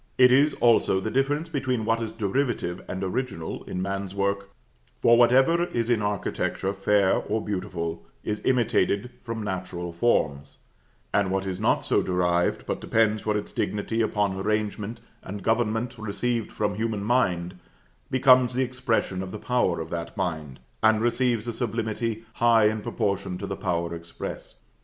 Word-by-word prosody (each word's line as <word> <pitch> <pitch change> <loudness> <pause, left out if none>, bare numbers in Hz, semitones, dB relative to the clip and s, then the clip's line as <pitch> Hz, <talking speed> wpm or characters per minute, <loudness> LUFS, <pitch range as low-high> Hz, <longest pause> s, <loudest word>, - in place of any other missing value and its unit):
It 125 -1 +7
is, 140 +4 +4
also, 115 -5 +3
the 110 +3 -3
difference 145 +5 +1
between 130 -7 -1
what 115 +1 +1
is 110 -1 -3
derivative 110 -4 -1
and 95 +1 -4
original 95 -4 -3
in 90 - -3
man's 100 0 -3
work; 100 0 -1 0.5
for 120 - +6
whatever 130 +8 +5
is 120 -7 -1
in 115 -3 +2
architecture 100 -1 -1
fair 100 0 +3
or 110 +2 -1
beautiful, 90 -5 -4 0.2
is 105 0 -3
imitated 120 -2 +1
from 115 -2 -5
natural 90 -3 -4
forms; 80 -8 0 0.6
and 100 -2 +2
what 95 0 -1
is 95 -2 -3
not - - +1
so - - +2
derived, 90 -1 +1
but - - -3
depends 110 -1 +2
for 105 -1 0
its 105 - -5
dignity 110 +2 -1
upon 105 -3 +1
arrangement 105 +2 -2 0.2
and 100 +1 -7
government 115 +1 0
received 110 +2 -2
from 105 -1 -1
human 110 -1 -2
mind, 90 -7 0 0.5
becomes 130 -1 +5
the 130 - +2
expression 125 -7 -1
of 95 - -5
the 105 - -6
power 115 -7 0
of 80 0 -6
that 85 +4 -5
mind, 80 -8 -3 0.2
and 110 0 +4
receives 120 -1 +1
a 120 - -2
sublimity 115 -1 -2 0.2
high 115 -2 +5
in 110 0 +1
proportion 100 -3 -2
to 100 - -5
the 95 - -4
power 85 -3 -2
expressed. 85 0 -8
105 Hz, 160 wpm, -26 LUFS, 95-120 Hz, 0.6 s, It